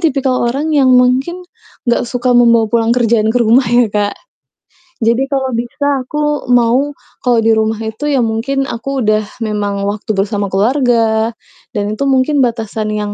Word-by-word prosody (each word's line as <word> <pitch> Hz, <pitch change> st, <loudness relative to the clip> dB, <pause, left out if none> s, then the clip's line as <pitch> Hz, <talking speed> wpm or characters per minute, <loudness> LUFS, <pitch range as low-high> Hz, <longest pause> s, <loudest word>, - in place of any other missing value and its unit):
tipikal 270 Hz, -6 st, 0 dB
orang 295 Hz, +6 st, -2 dB
yang 275 Hz, -3 st, +3 dB
mungkin 265 Hz, +9 st, +1 dB, 0.4 s
nggak 240 Hz, 0 st, 0 dB
suka 245 Hz, 0 st, 0 dB
membawa 235 Hz, -2 st, +4 dB
pulang 230 Hz, -1 st, +2 dB
kerjaan 230 Hz, -2 st, +2 dB
ke 235 Hz, -, 0 dB
rumah 240 Hz, +2 st, +3 dB
ya, 240 Hz, 0 st, +4 dB
Kak. 205 Hz, -1 st, -1 dB, 0.8 s
Jadi, 235 Hz, +4 st, 0 dB
kalau 265 Hz, -2 st, -1 dB
bisa 240 Hz, +5 st, -3 dB
aku 295 Hz, 0 st, -3 dB
mau, 245 Hz, +4 st, +3 dB, 0.3 s
kalau 245 Hz, -2 st, +2 dB
di 225 Hz, 0 st, +3 dB
rumah 220 Hz, 0 st, 0 dB
itu 220 Hz, +7 st, -4 dB
ya 280 Hz, -, +1 dB
mungkin 270 Hz, +5 st, -1 dB
aku 260 Hz, 0 st, -4 dB
udah 215 Hz, 0 st, +1 dB, 0.2 s
memang 205 Hz, -2 st, -2 dB
waktu 205 Hz, +1 st, -5 dB
bersama 200 Hz, 0 st, -1 dB
keluarga 225 Hz, 0 st, +1 dB, 0.5 s
dan 205 Hz, +1 st, -1 dB
itu 275 Hz, +5 st, -1 dB
mungkin 270 Hz, +2 st, +2 dB
batasan 225 Hz, -3 st, -2 dB
yang 210 Hz, -1 st, -3 dB
235 Hz, 160 wpm, -14 LUFS, 220-265 Hz, 0.8 s, membawa